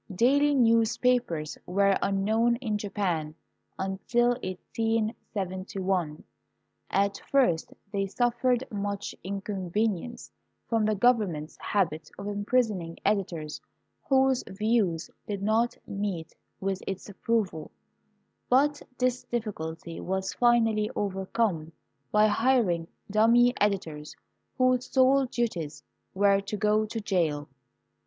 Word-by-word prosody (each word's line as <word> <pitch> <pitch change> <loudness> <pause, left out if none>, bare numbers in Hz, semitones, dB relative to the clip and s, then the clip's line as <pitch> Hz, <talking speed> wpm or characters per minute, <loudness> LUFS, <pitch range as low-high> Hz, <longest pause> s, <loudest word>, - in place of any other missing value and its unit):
Daily 285 +7 +4
newspapers 230 - +2
were 195 +2 +3
unknown 220 +4 +2
in 220 -4 -2
Japan 180 -7 -2 0.4
until 195 +6 +1
1871. 190 -4 -2 0.7
At 200 0 +1
first 245 -13 +2 0.2
they 195 -1 0
suffered 245 +3 +1
much 200 -1 -3
inconvenience 200 +3 -2 0.4
from 225 -2 +1
the 215 0 +2
govern 220 -4 +3
ment's 150 +1 -7
habit 160 -6 -1
of 200 - -7
imprisoning 205 -4 0
editors 175 -7 -1 0.5
whose 265 -1 +3
views 200 -5 0 0.2
did 200 -2 -3
not 225 +3 +2
meet 195 -5 -4 0.3
with 195 0 -2
its 195 -1 -4
approval, 200 -6 -1 0.8
but 285 +3 +3 0.2
this 250 0 0
difl&culty 165 -8 -4
was 190 0 -2
finally 225 -3 +3
over 195 -2 -2
come 170 -9 0 0.4
by 210 0 +5
hiring 215 -7 +2 0.2
dummy 235 +3 +5
editors 165 -7 -1 0.4
whose 255 -1 +2
sole 265 0 +4
duties 175 -12 -3 0.3
were 200 0 +4
to 200 +1 -4
go 215 +1 +2
to 225 +1 -4
jail. 165 -8 0
205 Hz, 105 wpm, -28 LUFS, 185-235 Hz, 0.8 s, by